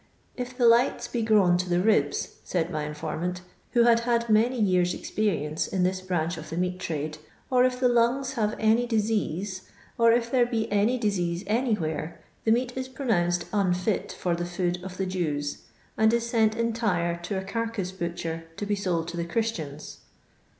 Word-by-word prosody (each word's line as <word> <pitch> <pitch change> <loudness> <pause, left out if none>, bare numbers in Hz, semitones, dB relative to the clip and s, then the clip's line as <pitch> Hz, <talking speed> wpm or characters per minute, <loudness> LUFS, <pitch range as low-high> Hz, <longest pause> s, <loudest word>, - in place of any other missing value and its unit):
'If 250 0 -6
the 245 - +3
lights 235 +2 +4
be 240 - -2
grown 205 -5 +4
to 180 0 -2
the 175 0 +2
ribs,' 180 -8 +1
said 175 -1 -1
my 150 -1 -2
informant, 160 +4 -4 0.3
who 240 - +5
had 235 -1 +5
had 235 -1 0
many 235 +4 +3
years' 180 -4 +2
ex - - -8
perience 160 -8 -1
in 185 -2 +1
this. 185 +1 0
branch 175 -2 -1
of 155 0 -8
the 165 - -5
meat 180 0 -1
trade, 155 -2 -4 0.3
'or 250 -1 +5
if 250 -1 0
the 255 - +4
lungs 245 +3 +2
have 215 -5 0
any 225 +2 +3
disease, 205 -4 -1 0.3
or 230 0 +6
if 235 0 +1
there 245 -2 +4
be 225 -2 -1
any 210 +5 +2
disease 185 -6 -1
anywhere, 210 -9 -1 0.3
the 220 - +4
meat 245 +2 +1
is 260 0 -3
pronounced 185 -10 0
unfit 190 0 0
for 175 -2 -1
the 175 - -3
food 175 0 -1
of 185 -1 -7
the 190 - -1
Jews, 155 -6 -2 0.4
and 220 0 +4
is 235 0 +1
sent 220 -2 +2
entire 220 -7 0
to 180 +3 -4
a 190 - -3
carcase 225 -2 -3
butcher 170 -2 -4
to 205 - -3
be 205 - 0
sold 180 -5 -1
to 170 - -6
the 170 - -1
Christians. 170 -7 -3
195 Hz, 185 wpm, -26 LUFS, 175-230 Hz, 0.4 s, or